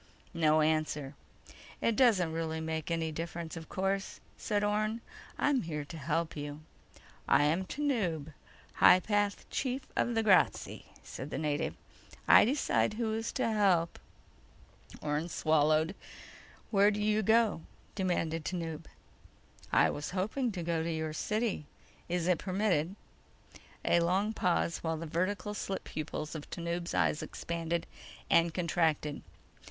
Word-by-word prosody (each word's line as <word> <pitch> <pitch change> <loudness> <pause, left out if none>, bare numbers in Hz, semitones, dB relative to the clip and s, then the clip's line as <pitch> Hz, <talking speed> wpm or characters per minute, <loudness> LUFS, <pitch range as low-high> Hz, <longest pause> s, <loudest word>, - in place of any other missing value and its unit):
No 155 -2 +3
answer. 155 -2 0 0.7
"It 230 - +1
doesn't 200 -11 +4
really 160 -1 -2
make 160 -1 -3
any 165 -1 -1
difference, 165 +1 -5
of 160 -1 -8
course," 195 0 -2 0.2
said 205 -1 -1
Orne. 215 +2 0 0.4
"I'm 285 -4 +2
here 150 -3 -4
to 155 - -9
help 160 +3 -1
you." 145 0 -6 0.7
"I - - +5
am 165 +6 +1
Tanub, 185 - -1 0.4
High 185 - +8
Path 205 0 0
Chief 260 0 -1
of 240 - +1
the 225 - +2
Grazzi," 195 -4 +2 0.2
said 130 - -7
the - - -4
native. 150 0 -1 0.5
"I - - +8
decide 255 -4 +1
who 220 -1 -1
is 225 +1 -2
to - - 0
help." 195 -6 +2 1.0
Orne 150 +3 -1
swallowed. 155 +2 +2 0.8
"Where 200 -1 +5
do 210 0 -2
you 210 +1 +2
go?" 220 -4 +3 0.3
demanded 165 -4 -1
Tanub. 165 -3 -4 0.9
"I - - +4
was 145 - -5
hoping 225 +6 0
to 175 -3 -4
go 165 -1 0
to 165 +1 -2
your 160 -1 -2
city. 215 -4 -1 0.4
Is 175 -1 0
it 180 -3 +3
permitted?" 185 -3 0 0.9
A 170 - +4
long 190 +6 +1
pause 180 -4 +1
while 160 -1 -2
the 165 - -5
vertical 185 +6 -1
slit 195 -2 -4
pupils 155 0 -5
of 155 -3 -7
Tanub's 170 +1 -3
eyes 150 - +2
expanded 170 0 -3 0.5
and 170 0 +5
contracted. 160 -4 0
170 Hz, 135 wpm, -31 LUFS, 160-205 Hz, 1.0 s, High